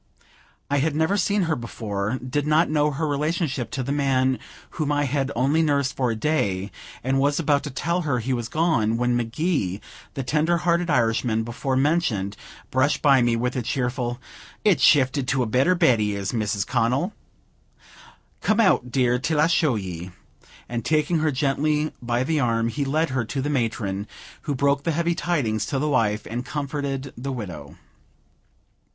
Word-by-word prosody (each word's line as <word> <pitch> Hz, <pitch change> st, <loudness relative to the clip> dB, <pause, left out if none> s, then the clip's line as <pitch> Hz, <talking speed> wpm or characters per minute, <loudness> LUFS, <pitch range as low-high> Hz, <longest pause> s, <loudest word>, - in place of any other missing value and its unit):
I 145 Hz, -, +1 dB
had 150 Hz, +1 st, 0 dB
never 160 Hz, +5 st, +2 dB
seen 205 Hz, 0 st, +1 dB
her 165 Hz, -2 st, 0 dB
before, 110 Hz, -2 st, -3 dB
did 145 Hz, +3 st, -1 dB
not 155 Hz, +1 st, +3 dB
know 150 Hz, -1 st, +2 dB
her 150 Hz, +2 st, -2 dB
relationship 145 Hz, -3 st, -1 dB
to 135 Hz, -, -3 dB
the 135 Hz, -, -3 dB
man 130 Hz, -2 st, +1 dB, 0.3 s
whom 150 Hz, -3 st, -2 dB
I 145 Hz, 0 st, +1 dB
had 140 Hz, 0 st, -1 dB
only 140 Hz, +7 st, +2 dB
nursed 140 Hz, -3 st, +1 dB
for 130 Hz, -2 st, 0 dB
a 115 Hz, -, -1 dB
day, 100 Hz, -7 st, -1 dB, 0.3 s
and 135 Hz, +2 st, +1 dB
was 145 Hz, +2 st, +2 dB
about 145 Hz, -3 st, +2 dB
to -, -, -3 dB
tell 170 Hz, +6 st, -1 dB
her 145 Hz, -6 st, 0 dB
he 125 Hz, +3 st, -1 dB
was 120 Hz, -2 st, -3 dB
gone, 130 Hz, -9 st, +1 dB
when 120 Hz, 0 st, +1 dB
McGee, 120 Hz, -, -1 dB, 0.4 s
the 135 Hz, -, -2 dB
tender 155 Hz, +6 st, +1 dB
hearted 170 Hz, 0 st, +1 dB
Irishman 115 Hz, -3 st, +1 dB
before 120 Hz, +3 st, -3 dB
mentioned, 130 Hz, -, +1 dB, 0.4 s
brushed 130 Hz, +3 st, +1 dB
by 135 Hz, -3 st, +6 dB
me 120 Hz, -1 st, +2 dB
with 125 Hz, +2 st, -1 dB
a 125 Hz, -, 0 dB
cheerful 125 Hz, 0 st, -2 dB, 0.5 s
"It's 185 Hz, -10 st, +4 dB
shifted 135 Hz, -1 st, +4 dB
to 130 Hz, -1 st, +1 dB
a -, -, -1 dB
better 130 Hz, +11 st, +2 dB
bed 145 Hz, -10 st, +4 dB
he 105 Hz, -1 st, 0 dB
is, 100 Hz, -1 st, -3 dB
Mrs. 105 Hz, -4 st, -1 dB
Connel. 130 Hz, -, 0 dB, 1.3 s
Come 215 Hz, +1 st, +1 dB
out, 185 Hz, -, +3 dB
dear, 125 Hz, -1 st, +2 dB
till 150 Hz, +3 st, 0 dB
I 150 Hz, -, +5 dB
show 160 Hz, -5 st, +2 dB
ye;" 90 Hz, -3 st, -5 dB, 0.6 s
and, 120 Hz, -1 st, -3 dB
taking 155 Hz, +3 st, +1 dB
her 155 Hz, 0 st, +2 dB
gently 150 Hz, +2 st, 0 dB
by 120 Hz, +1 st, 0 dB
the 155 Hz, +3 st, 0 dB
arm, 115 Hz, -3 st, +1 dB
he 140 Hz, +5 st, -2 dB
led 155 Hz, +2 st, 0 dB
her 130 Hz, -2 st, 0 dB
to 135 Hz, -, -4 dB
the 145 Hz, +3 st, -1 dB
matron, 110 Hz, -6 st, -2 dB, 0.4 s
who 145 Hz, -, 0 dB
broke 140 Hz, +1 st, +2 dB
the 165 Hz, +2 st, -1 dB
heavy 170 Hz, +2 st, +1 dB
tidings 130 Hz, -12 st, -1 dB
to 140 Hz, -, -1 dB
the 150 Hz, +3 st, 0 dB
wife, 110 Hz, -6 st, +1 dB
and 120 Hz, +3 st, -4 dB
comforted 140 Hz, -1 st, -4 dB
the 135 Hz, +3 st, -5 dB
widow. 90 Hz, -, -7 dB
135 Hz, 180 wpm, -24 LUFS, 120-150 Hz, 1.3 s, by